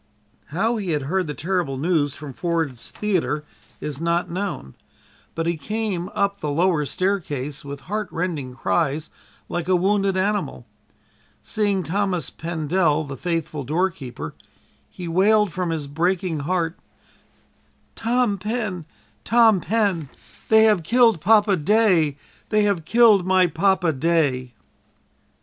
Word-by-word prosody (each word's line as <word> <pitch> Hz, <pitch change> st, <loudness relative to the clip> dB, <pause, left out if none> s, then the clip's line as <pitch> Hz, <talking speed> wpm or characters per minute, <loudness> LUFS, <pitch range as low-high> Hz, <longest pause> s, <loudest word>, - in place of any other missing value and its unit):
How 220 Hz, +9 st, 0 dB
he 190 Hz, -6 st, -2 dB
had 145 Hz, -2 st, -1 dB
heard 180 Hz, +5 st, -1 dB
the 150 Hz, -, -4 dB
terrible 170 Hz, -5 st, -1 dB
news 150 Hz, -2 st, +1 dB
from 145 Hz, -3 st, -8 dB
Ford's 160 Hz, -6 st, -2 dB
Theater 180 Hz, -7 st, -1 dB, 0.4 s
is 150 Hz, 0 st, -5 dB
not 170 Hz, +1 st, 0 dB
known, 180 Hz, -, -4 dB, 0.6 s
but 165 Hz, -, -2 dB
he 170 Hz, 0 st, 0 dB
came 210 Hz, -1 st, -3 dB
up 200 Hz, 0 st, 0 dB
the 150 Hz, -, -3 dB
lower 160 Hz, -1 st, +1 dB
stairway 155 Hz, -8 st, -1 dB
with 140 Hz, 0 st, -7 dB
heartrending 175 Hz, -9 st, -3 dB
cries 155 Hz, +2 st, -1 dB, 0.4 s
like 175 Hz, -1 st, -3 dB
a 185 Hz, -, +3 dB
wounded 195 Hz, +1 st, +1 dB
animal. 190 Hz, -, -1 dB, 0.8 s
Seeing 205 Hz, -3 st, 0 dB
Thomas 185 Hz, 0 st, -1 dB
Pendel, 160 Hz, -1 st, 0 dB
the 140 Hz, -2 st, -7 dB
faithful 165 Hz, -2 st, -3 dB
doorkeeper, 140 Hz, -, -3 dB, 0.6 s
he 180 Hz, -, -8 dB
wailed 200 Hz, +4 st, +3 dB
from 180 Hz, 0 st, -2 dB
his 160 Hz, -3 st, -2 dB
breaking 170 Hz, +3 st, -1 dB
heart: 170 Hz, +2 st, -1 dB, 1.2 s
"Tom 230 Hz, -3 st, +1 dB
Pen, 210 Hz, -5 st, -3 dB, 0.4 s
Tom 225 Hz, -4 st, +5 dB
Pen, 195 Hz, -7 st, 0 dB, 0.4 s
they 220 Hz, 0 st, +7 dB
have 210 Hz, -5 st, +4 dB
killed 230 Hz, 0 st, +3 dB
Papa 210 Hz, 0 st, +4 dB
day! 175 Hz, -4 st, +3 dB, 0.3 s
They 215 Hz, -1 st, +3 dB
have 200 Hz, -6 st, 0 dB
killed 225 Hz, -4 st, +5 dB
my 185 Hz, -1 st, +5 dB
Papa 180 Hz, -2 st, +2 dB
day!" 140 Hz, -5 st, 0 dB
175 Hz, 125 wpm, -23 LUFS, 155-200 Hz, 1.2 s, they